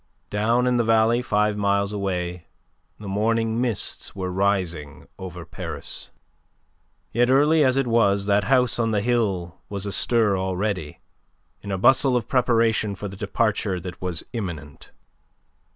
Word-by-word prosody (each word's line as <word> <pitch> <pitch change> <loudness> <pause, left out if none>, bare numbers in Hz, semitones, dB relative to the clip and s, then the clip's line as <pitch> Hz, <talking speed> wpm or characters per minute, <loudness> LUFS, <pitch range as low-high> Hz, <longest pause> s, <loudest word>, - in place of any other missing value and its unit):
Down 115 +4 +2
in 125 -1 +2
the 120 - +2
valley, 115 +1 +3
five 105 -3 +1
miles 100 0 +1
away, 90 -3 -3 0.5
the 105 - -8
morning 115 +3 0
mists 120 -5 -2
were 95 -2 -3
rising 90 -6 -1
over 90 -2 -7
Paris. 85 -2 -6 1.0
Yet 120 +2 +2
early 150 +4 +4
as 130 -1 +3
it 135 - +2
was 100 -4 +2
that 100 0 +2
house 125 -2 +2
on 115 -1 +1
the 105 -2 +1
hill 100 -7 -1
was 100 -1 -4
astir 105 +1 +2
already, 95 -3 -3 0.6
in 100 - -6
a 95 - -1
bustle 130 +5 +4
of 115 - -3
preparation 115 -5 +2
for 105 +2 -6
the 100 - -8
departure 100 -2 -1
that 90 0 -8
was 90 -4 -2
imminent. 85 - -6
105 Hz, 145 wpm, -23 LUFS, 95-115 Hz, 1.0 s, early